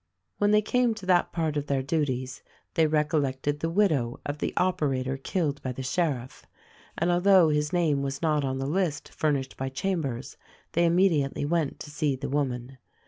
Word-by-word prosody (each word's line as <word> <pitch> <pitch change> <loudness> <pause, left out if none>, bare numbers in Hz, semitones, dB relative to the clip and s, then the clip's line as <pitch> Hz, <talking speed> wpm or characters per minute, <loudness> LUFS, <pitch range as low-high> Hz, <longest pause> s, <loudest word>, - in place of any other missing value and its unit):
When 205 - +3
they 210 0 +4
came 245 +1 +2
to 215 - -9
that 180 -1 +3
part 160 -3 -1
of 145 0 -3
their 135 -2 0
duties 130 -4 -2 0.3
they 160 -1 +3
recol 150 0 +2
lected 140 +2 -2
the 165 - -1
widow 160 - +1
of 145 +1 -4
the - - -1
operator 135 -7 0
killed 145 +1 -2
by 130 - -3
the 130 - -6
sheriff, 130 -4 -2 0.5
and 170 +2 +1
although 180 -1 +5
his 150 0 0
name 160 -6 +2
was 140 0 -3
not 155 -3 +1
on 130 -1 -1
the 135 - -2
list 160 0 -1
furnished 140 -4 -1
by 135 0 -2
Chambers 140 -5 -3 0.3
they 170 +1 +2
immediately 165 -6 +2
went 160 -2 0
to 150 - -8
see 150 -2 0
the 130 - -5
woman. 130 -2 -2
150 Hz, 185 wpm, -27 LUFS, 135-170 Hz, 0.5 s, although